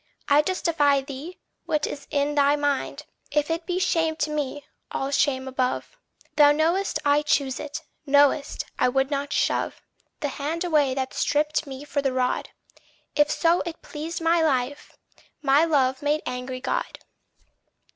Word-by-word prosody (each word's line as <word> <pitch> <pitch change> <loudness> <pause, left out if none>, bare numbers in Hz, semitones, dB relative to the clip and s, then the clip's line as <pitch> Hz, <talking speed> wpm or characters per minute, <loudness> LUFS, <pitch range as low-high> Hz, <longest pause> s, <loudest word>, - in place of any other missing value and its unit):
I 285 +1 +5
justify 300 -5 +2
thee: 280 +6 -8 0.3
what 305 -1 +1
is 280 - -6
in 285 0 0
thy 285 0 +4
mind, 290 -2 -2 0.2
If 295 +2 0
it 330 +1 -3
be 360 -1 -1
shame 330 -4 +1
to 305 -1 -1
me, 290 -1 -3 0.3
all 270 +1 -2
shame 275 -2 +1
above. 260 - -2 0.4
Thou 290 -1 +8
know'st 335 +6 +1
I 290 +1 +4
choose 280 -3 0
it 300 +2 -6 0.2
know'st 285 +1 +3
I - - +4
would 270 +2 0
not 285 0 -2
shove - - 0 0.4
The 290 - 0
hand 305 +5 -3
away 295 -6 +2
that 260 -1 -3
stripped 300 +1 0
me 270 0 -7
for 290 -1 -1
the 270 -2 0
rod 255 -1 0 0.7
If 295 0 +4
so 335 +2 +2
it 335 -1 -7
pleased 320 +3 -5
my 330 +1 +3
Life, 285 -2 -1 0.5
my 285 +3 +5
love 265 -5 +2
made 295 +1 0
angry 250 0 -4
God. - - -2
290 Hz, 155 wpm, -25 LUFS, 275-315 Hz, 0.7 s, Thou